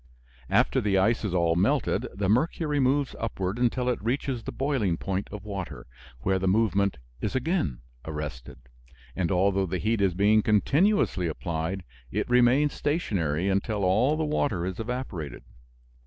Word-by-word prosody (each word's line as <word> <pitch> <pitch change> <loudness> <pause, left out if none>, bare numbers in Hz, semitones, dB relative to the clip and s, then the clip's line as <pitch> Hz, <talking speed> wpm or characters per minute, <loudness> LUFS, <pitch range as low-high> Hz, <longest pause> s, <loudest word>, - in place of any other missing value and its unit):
After - - +3
the 100 -2 +1
ice 110 +5 +2
is 95 -4 -1
all 85 -2 +2
melted 85 - +1
the 100 -1 -1
mercury 150 - +1
moves 135 +1 +1
upward 100 -1 -3
until 125 +1 +1
it 125 - 0
reaches 125 +1 -1
the - - -6
boiling 130 - 0
point 95 +2 -3
of 105 0 -8
water, 100 -3 -6 0.4
where 95 +6 +1
the 95 - -1
movement 100 -1 +2 0.2
is 105 - -2
again 130 - -1 0.2
arrested, 75 -5 -6 0.6
and 90 0 0
although 95 +1 +2
the 90 +2 -2
heat 110 +3 0
is 95 -3 +2
being 105 +3 +4
continuously 135 - +2
applied, 85 +3 -3 0.3
it 105 +9 -2
remains 125 +4 +4
stationary 95 - -1
until 100 +1 0
all 115 +11 +3
the 160 - 0
water 130 - 0
is 95 -1 -4
evaporated. 105 - -5
100 Hz, 155 wpm, -27 LUFS, 90-125 Hz, 0.6 s, being